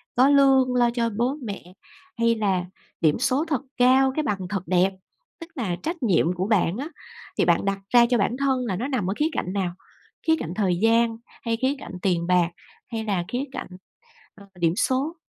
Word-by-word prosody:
có 255 +3 +5
lương 270 -3 +4
lo 240 -1 +4
cho 235 -1 0
bố 250 +5 0
mẹ, 195 -5 -7 0.4
hay 230 0 +3
là 195 -5 0 0.4
điểm 155 -2 +3
số 265 +5 +1
thật 290 -6 -1 0.2
cao, 260 +2 +5
cái 310 - 0
bằng 195 -10 -2
thật 195 -3 -2
đẹp? 185 +2 +2 0.5
Tức 330 - -9
là 210 -9 -2
trách 330 -1 -4
nhiệm 180 -5 +2
của 185 +2 -2
bạn 200 -3 +2
á, 285 +5 -4 0.5
thì - - +3
bạn - - +2
đặt 195 0 -1
ra 240 -1 +7
cho 245 - +3
bản 230 +4 0
thân 265 -2 0
là 195 -6 -2
nó 235 +8 -3
nằm 250 -10 -1
ở - - 0
khía 300 - +2
cạnh 185 - -3
nào? 190 -3 -1 0.5
Khía 320 - +5
cạnh 165 - -5
thời 190 -4 +1
gian 230 0 +3 0.2
hay 230 -1 -1
khía 260 +4 0
cạnh - - -9
tiền 175 -3 0
bạc, 180 -2 +3 0.4
hay 225 -1 -3
là 195 -5 -1
khía 250 +2 -2
cạnh, - - -6 0.7
ơ, 200 - -15
điểm 170 -1 +2
số? 270 +7 0
230 Hz, 210 wpm, -24 LUFS, 190-260 Hz, 0.7 s, ra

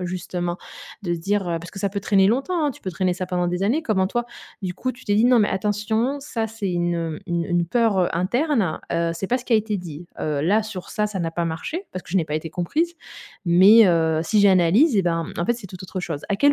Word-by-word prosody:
justement? 180 -1 -3 0.4
De 175 -3 -1
se 170 - -5
dire, 195 +1 -1
heu 170 - -1
parce 170 +1 -10
que 195 - -9
ça 200 - 0
peut 200 +1 -4
traîner 195 0 +3
longtemps, 275 - +1
hein! - - +1
Tu - - -17
peux 190 - -3
traîner 180 +1 0
ça 185 0 -3
pendant 180 -1 -1
des 180 +2 -2
années. 250 +11 +1
Comment 190 -9 +1
toi, 240 +4 -2 0.3
du 180 -2 -4
coup, 255 0 -2
tu 255 - -17
t'es 205 - +2
dit: 220 +3 +4
«Non, 245 -1 +5
mais 210 - +3
attention 210 +7 -1
ça 235 -5 -3
c'est 220 -3 -4
une, 170 -2 -1
une 170 -2 -1
une 175 +1 +1
peur, 225 0 +2
heu, 180 - +2
interne, 215 - 0
heu, 170 0 0
c'est 180 +3 -4
pas 250 +6 +1
ce 250 - -12
qui 235 - +3
a - - +7
été 215 -2 -1
dit. 170 -1 -8
Heu, 150 -2 -1
là, 210 +6 +3
sur 205 -4 -7
ça, 210 0 0
ça 205 -2 -5
n'a 165 -1 -1
pas 170 0 -2
marché 300 - -4
parce 185 - -6
que - - -14
je 190 - +2
n'ai 160 - -1
pas 150 - -3
été 155 +1 -3
comprise, 300 - -1 0.5
mais 195 +6 +7
heu, 160 -2 +2
si 210 +6 +2
j'analyse 195 - +5
et 195 - +3
ben, 165 -2 0
mmh, - - -7
en 170 - -1
fait 240 - +2
c'est 225 -4 -9
tout 185 0 -10
autre 185 0 -5
chose.»? 160 -5 -4
À 200 - 0
quel 285 +4 +4
190 Hz, 270 wpm, -23 LUFS, 175-220 Hz, 0.5 s, a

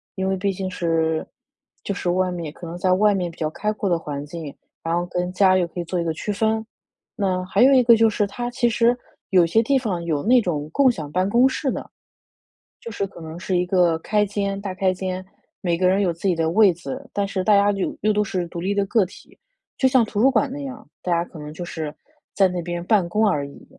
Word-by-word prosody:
因 190 0 -2
为 190 - 0
毕 195 +1 0
竟 190 0 -4
是 160 -2 0 0.6
就 200 - -2
是 180 - -2
外 185 0 +1
面 165 -4 -5
可 170 - -10
能 170 - -6
在 185 0 +2
外 205 +2 +4
面 180 -3 -2
比 - - -19
较 155 -1 -1
开 210 +6 -2
阔 205 -2 -2
的 175 - +2
环 145 -3 -5
境， 150 -1 -7 0.3
然 165 0 -1
后 175 0 0
跟 180 0 -3
家 185 -1 +4
又 180 - +2
可 175 - -8
以 175 - -1
做 180 +1 -2
一 - - 0
个 165 -1 -1
区 205 +6 -4
分。 220 +2 0 0.5
那 185 -4 0
还 195 +4 +3
有 270 +1 +7
一 255 - +6
个 235 -1 +7
就 225 0 +5
是， 205 -1 0
它 240 +5 -5
其 240 -1 +1
实 235 +2 +3 0.4
有 180 -2 +6
些 220 +7 +3
地 275 +4 +2
方 195 -9 -3
有 150 -4 0
那 250 +4 +5
种 155 -6 -3
共 275 +5 +4
享 155 -9 -7
办 185 +2 +1
公 245 +5 +5
室 265 0 -2
的， - - -6 0.9
就 230 - -8
是 200 -2 -2
可 185 - -13
能 160 +1 -8
是 185 0 -1
一 180 - +2
个 175 -3 +3
开 210 +3 +1
间 200 -1 -2
大 195 -2 -5
开 185 0 +1
间， 185 0 -4 0.4
每 170 -3 0
个 185 - +2
人 195 +2 +3
有 180 -3 +1
自 165 +4 -6
己 180 - +3
的 160 -1 0
位 200 +1 +5
子， 260 +10 -7
但 200 -1 0
是 190 -1 -2
大 210 - +5
家 200 +1 +4
就 195 -1 -3
又 215 +1 +3
都 210 0 +2
是 180 -3 -2
独 170 - -6
立 195 +3 -1
的 200 -1 +1
个 215 0 +3
体， - - -17 0.4
就 265 - +4
像 255 -2 +4
图 210 -1 -3
书 270 - +6
馆 280 - +2
那 285 - -6
样， 265 -1 -8 0.2
大 180 - -1
家 170 0 +2
可 165 - -11
能 150 0 -8
就 175 - -6
是 160 -3 -5 0.4
在 195 -2 +4
那 180 -1 -3
边 175 0 -4
办 190 -4 +2
公 215 +5 +2
而 145 -8 +1
已。 - - -14
185 Hz, 280 characters per minute, -22 LUFS, 170-210 Hz, 0.9 s, 有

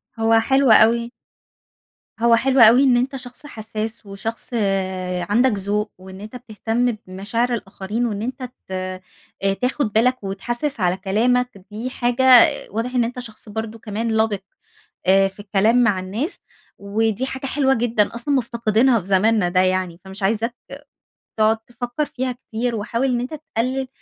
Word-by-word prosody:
هو 225 0 +3
حلو 265 +1 +3
أوي 235 +2 +5 1.1
هو 235 0 +5
حلو 265 +3 +2
أوي 235 +4 +8
إن 255 -3 +4
أنت 265 +3 -1
شخص 250 +2 -10
حسّاس، 220 -2 -6
وشخص 210 +3 -6 0.8
عندك 245 +4 +3
ذوق، 205 +1 -2
وإن 190 +1 -11
أنت 215 +4 -9
بتهتم 240 0 -1 0.2
بمشاعر 230 +6 -2
الآخرين 210 +2 -3
وإن 210 -3 -3
أنت 255 +2 -5 0.2
ت - - -14 0.7
أ 195 0 +2
تاخُد 250 0 -1
بالك 250 +1 +2
وتحسّس 240 +9 -3
على 180 0 +1
كلامك، 220 +2 0
دي 230 +5 -4
حاجة 245 +1 -1 0.5
واضح 235 +4 -3
إن 245 - +3
أنت 245 +2 -4
شخص 220 -2 -11
برضه 220 +1 -5
كمان 220 +1 -3
لَبِق 220 -3 +1 0.7
آآ 195 +1 +5
في 195 +1 -14
الكلام 210 +4 +2
مع 200 -5 +2
الناس. 220 - -4 0.4
ودي 220 +4 -1
حاجة 265 +1 -5
حلوة 270 -1 +2
جدًا 230 -3 0
أصلًا 260 +5 -1
مُفتقدينها 235 -1 +2
في 180 - -13
زماننا 200 0 +3
ده 185 +1 +2
يعني. 185 -2 0
فمش 190 +1 -10
عايزاك 225 +4 0 0.8
تقعد 220 +1 +3
تفكّر 240 +5 -4
فيها 255 -2 -3
كتير، 240 -1 -4
وحاول 230 +5 -1
إن 245 -2 0
أنت 255 +5 -5
تقلِّل 265 -3 -3
225 Hz, 150 wpm, -21 LUFS, 205-245 Hz, 1.1 s, أوي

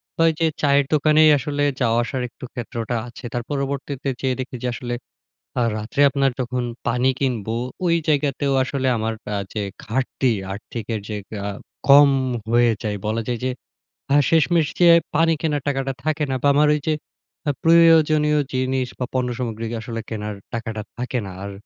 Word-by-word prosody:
তো - - -22
ওই - - +5
যে 165 - +3
চায়ের 140 -1 +4
দোকানেই 155 +1 +5
আসলে 145 +1 -2 0.2
যাওয়া-আসার 120 +2 +1
একটু 125 - -10
ক্ষেত্রটা 120 -1 -4
আছে। 120 +1 -11
তার 120 - -2
পরবর্তীতে 140 0 -3
যেয়ে 130 -1 0
দেখি 130 0 -5
যে - - 0
আসলে 120 0 -4 0.7
আ - - +2 0.2
রাত্রে 110 +6 -2
আপনার 135 -1 +1
যখন 125 0 -1 0.2
পানি 125 +2 +2
কিনবো 115 -5 -1 0.3
ওই 170 - +3
জায়গাতেও 140 -2 +1
আসলে 130 0 -2
আমার 110 +1 -1 0.2
আ - - 0 0.2
যে 105 - -2 0.2
ঘাটতি, 130 +2 0 0.2
আর্থিকের 110 +1 -5
যে 105 - -3 0.3
আ - - -2 0.4
কম 140 +1 +8 0.4
হয়ে 120 0 +4
যায় 105 -2 -2
বলা 110 +1 0
যায় 120 -2 -2
যে 130 - +1 0.6
আ - - +6
শেষমেষ 165 0 +3
যেয়ে 170 -1 +8 0.2
পানি 165 +1 +4
কেনার 150 -3 0
টাকাটা 135 -1 -1
থাকে 155 0 0
না। 130 - 0
বা 145 - +3
আমার 150 +1 +4
ঐযে 150 +1 -1 0.5
আ - - +4
প্রয়োজনীয় 160 -2 +5
জিনিস 130 0 0
বা 125 - 0
পণ্য 130 -1 0
সামগ্রী 115 -2 -3 0.2
আসলে 115 -1 -5
কেনার 105 -2 -4 0.2
টাকাটা 110 -1 -4 0.2
থাকে 125 +1 -2
না। 95 - -7
আর 100 - -5
130 Hz, 170 wpm, -22 LUFS, 120-145 Hz, 0.7 s, কম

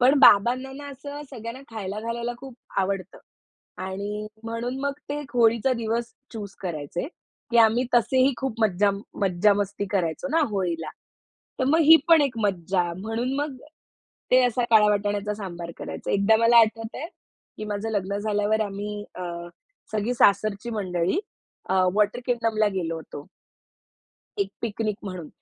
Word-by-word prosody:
पण 265 +4 +5
बाबांना 250 +5 +5
ना, 285 +1 -8
असं 285 +2 -8
सगळ्यांना 235 0 -7
खायला 210 -2 -5
घालायला 235 +1 -3
खूप 265 -1 -10 0.3
आवडतं. 190 -1 -3 0.6
आणि 200 +3 -4 0.2
म्हणून 235 +3 -3
मग 280 0 0 0.2
ते 290 - -2
एक 290 -1 -10
होळीचा 235 +2 +4
दिवस 230 +2 -2 0.2
चूज़ 205 -4 -7
करायचे. 170 - -4 0.4
की 235 - +2
आम्ही 230 +2 +5
तसेही 260 +3 +4
खूप 265 -2 -2
मज्जा 205 -1 +3 0.3
मज्जा 195 +2 +4
मस्ती 200 0 -2
करायचो 180 - -1
ना 330 - +3
होळीला. 170 -6 -2 0.7
तर 260 - +1
मग 295 +5 +3
ही 320 +1 +9
पण 330 -2 +7
एक 250 -5 -1
मज्जा, 185 -2 +1
म्हणून 225 +6 -2
मग 290 -2 -3 0.7
ते 255 - +7
असा 245 0 +1
काळ 220 -2 +7
वाटाण्याचा 205 0 0
सांबार 175 -5 -6
करायचे. - - -5
एकदा 200 +2 +4
मला 230 +1 +6
आठवत 225 0 0
आहे, 305 - -4 0.5
की 215 - -5
माझं 210 +1 -3
लग्न 200 -1 -1
झाल्यावर 210 +1 +1
आम्ही 205 0 -4
अ, 180 - -6 0.7
सगळी 215 +3 0
सासरची 215 0 +2
मंडळी 185 - -1 0.5
अ, - - +1 0.2
वॉटर 210 +3 +2
किंगडमला 225 -3 +1
गेलो 165 -2 -2
होतो. 150 -2 -9 1.1
एक 200 - +1
पिकनिक 215 -2 -2
म्हणून. 185 -6 -6
215 Hz, 150 wpm, -25 LUFS, 200-240 Hz, 1.1 s, ही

